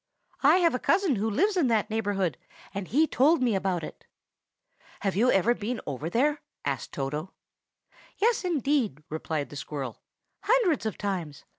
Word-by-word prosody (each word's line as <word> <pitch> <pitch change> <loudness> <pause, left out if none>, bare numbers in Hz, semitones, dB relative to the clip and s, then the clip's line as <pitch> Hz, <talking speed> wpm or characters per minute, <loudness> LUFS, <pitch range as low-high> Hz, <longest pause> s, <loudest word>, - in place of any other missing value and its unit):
I 290 +4 +6
have 340 -3 +3
a 250 - -1
cousin 360 - +2
who 215 +3 0
lives 390 - +2
in 340 -8 +3
that 220 -2 +1
neighborhood, 200 - 0 0.4
and 195 -2 -4
he 300 +7 +3
told 305 +3 +3
me 240 -3 +2
about 190 -3 0
it." - - -9 0.9
"Have 195 -2 0
you 235 +6 +3
ever 215 +4 +4
been 230 +1 -3
over 145 +3 -4
there?" 290 - +1 0.2
asked 135 -3 -2
Toto. 150 +6 -4 0.8
"Yes, 450 0 +2
indeed!" 280 - 0
replied 155 -1 -3
the - - -8
squirrel, 140 -4 -5 0.4
"hundreds 415 - +2
of 220 - -4
times. 180 -8 -4
220 Hz, 160 wpm, -27 LUFS, -, 0.9 s, I